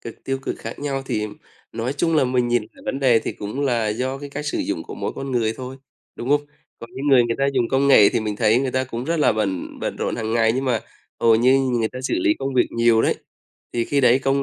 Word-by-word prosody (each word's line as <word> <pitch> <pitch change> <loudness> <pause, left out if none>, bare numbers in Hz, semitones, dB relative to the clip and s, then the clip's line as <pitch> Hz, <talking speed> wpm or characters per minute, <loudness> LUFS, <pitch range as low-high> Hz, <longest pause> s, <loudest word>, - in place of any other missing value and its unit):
cực, 115 - -10
tiêu 135 0 -2
cực - - -3
khác - - -7
nhau, 140 -2 -3
thì 105 0 -1 0.5
nói 120 +4 -2
chung 165 +2 +1
là 135 - +4
mình 125 -1 +1
nhìn 120 0 +2
cả 275 - -18
vấn 140 - -3
đề 125 -4 +5
thì - - -4
cũng 105 +7 -6
là 115 -5 +1
do 130 +5 -2
cái 145 0 -8
cách 145 +1 -5
sử - - -1
dụng - - -2
của - - -9
mỗi - - -4
con 135 0 -6
người 115 -3 +1
thôi, 130 +1 -7 0.4
đúng 120 - -5
không? 145 0 +4 0.4
Có 115 - -9
những 140 +2 -4
người 130 -3 +6
người 115 0 -1
ta 140 - +2
dùng 125 -3 +1
công 135 +1 +2
nghệ 105 -7 +8
thì - - 0
mình 105 -1 -3
thấy 110 +1 +3
người 135 -2 -1
ta 130 0 0
cũng 120 0 -5
rất 165 +2 0
là 150 - +3
bận 100 -4 -3
bận - - -3
rộn - - -2
hàng 110 -1 -3
ngày 115 -1 +3
nhưng 130 - -1
mà 120 -4 +1 0.4
hầu 115 -1 +5
như 130 +3 +4
người 120 -4 0
ta 130 - -8
xử - - -1
lý 325 -2 +3
công 135 -1 -3
việc 125 - +4
nhiều 115 -1 +3
đấy, - - +2 0.6
thì 115 -1 0
khi 145 - +1
đấy 125 0 +5
công 135 +1 +1
125 Hz, 275 wpm, -22 LUFS, 115-135 Hz, 0.6 s, nghệ